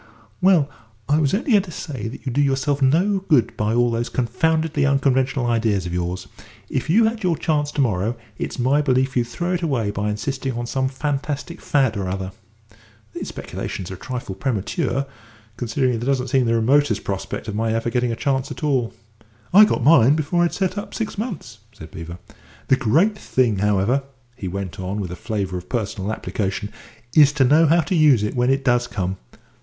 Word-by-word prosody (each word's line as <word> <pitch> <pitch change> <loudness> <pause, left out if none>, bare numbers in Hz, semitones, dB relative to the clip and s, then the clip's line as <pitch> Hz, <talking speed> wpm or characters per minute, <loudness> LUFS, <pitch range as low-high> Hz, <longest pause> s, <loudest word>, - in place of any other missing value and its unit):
"Well, 180 -6 +4 0.4
I 145 +2 +3
was 145 -3 +2
only 240 +5 -1
going 205 -3 +6
to 190 - -11
say 140 - -5
that 115 - -9
you 130 - -2
do 140 +4 +1
yourself 140 +1 +1
no 175 +9 +3
good 150 - +2
by 105 +2 0
all 120 0 +3
those 115 +1 -2
confoundedly 155 +5 0
unconventional 135 -2 +2
ideas 110 -5 +1
of 85 - -4
yours. 90 +1 -3 0.4
If 130 +3 -2
you 215 +8 +5
had 225 0 -1
your 175 -5 +1
chance 150 -1 0
to 145 - +1
morrow, 110 -1 0 0.2
it's - - -4
my 135 +4 +2
belief 130 -2 +1
you'd 120 -2 +2
throw 175 +8 -3
it 180 - -1
away 125 -11 0
by 105 +1 -2
insisting 130 +5 -3
on 120 +1 -3
some 130 +2 -1
fantastic 145 +4 -3
fad 135 -6 +1
or 100 -2 -2
other." 95 0 -4 0.8
"These - - -5
speculations 95 -1 -6
are - - -4
a - - -8
trifle 125 -6 -5
premature, 130 - -1 0.5
considering 125 +3 0
that 115 - -2
there 120 - -4
doesn't 130 -1 -1
seem 130 -2 +2
the 115 - +2
remotest 115 -1 +2
prospect 95 +3 -4
of 105 - -3
my 110 +1 0
ever 115 +1 -1
getting 125 0 0
a - - -2
chance 135 +1 -1
at - - -8
all." 130 -6 0 0.6
"I 210 +3 +9
got 165 - -1
mine 140 -1 +6
before 160 +3 +1
I'd 170 - +1
set 190 0 -1
up 205 - -8
six 220 -2 -3
months," 190 - -6
said 80 - -12
Beevor. 85 -2 -8 0.5
"The 130 - +6
great 160 - +2
thing, 125 - 0
however," 105 +6 +2 0.3
he 100 -6 -6
went 95 -1 -5
on, 95 +3 -3
with 95 -4 -4
a - - -5
flavour 100 -3 -3
of 90 - -15
personal 105 -4 -2
application, 105 -1 -3 0.5
"is 145 -2 +7
to 145 -2 +3
know 155 +5 +5
how 170 +3 +4
to 155 +4 -3
use 150 - +5
it 105 - -2
when 125 0 +2
it 135 0 +1
does 120 -1 +2
come. 95 -3 -3
130 Hz, 205 wpm, -22 LUFS, 110-150 Hz, 0.8 s, I